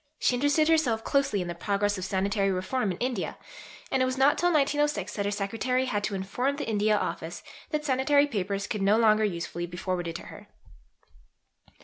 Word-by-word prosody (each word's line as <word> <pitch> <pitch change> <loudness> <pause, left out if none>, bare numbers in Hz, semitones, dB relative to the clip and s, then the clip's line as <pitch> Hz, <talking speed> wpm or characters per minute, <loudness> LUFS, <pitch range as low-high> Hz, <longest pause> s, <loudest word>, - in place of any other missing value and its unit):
She - - +2
interested 290 +4 +2
herself 275 -9 +2
closely 275 -9 +1
in - - -7
the 175 - -3
progress 205 +3 0
of 185 - -5
sanitary 195 +1 0
reform 195 +4 -1
in 175 - -5
India, 245 -6 -2 0.5
and 265 - +2
it - - +4
was 255 0 -2
not 275 +2 +5
till 350 +1 +2
1906 295 -1 +1
that 200 - -2
her 205 - 0
secretary 225 +6 -1
had 210 -5 -2
to 205 - -3
inform 245 +9 -1
the 290 - -5
India 215 -1 +2
Office - - -4 0.3
that 300 -1 -2
Sanitary 285 +1 +3
Papers 200 -6 -2
could 210 -1 -3
no 200 +2 +4
longer 220 -1 +4
usefully 175 -3 -3
be 175 +1 -9
forwarded 175 -2 -3
to - - -6
her. - - -12
215 Hz, 195 wpm, -27 LUFS, 195-270 Hz, 0.5 s, not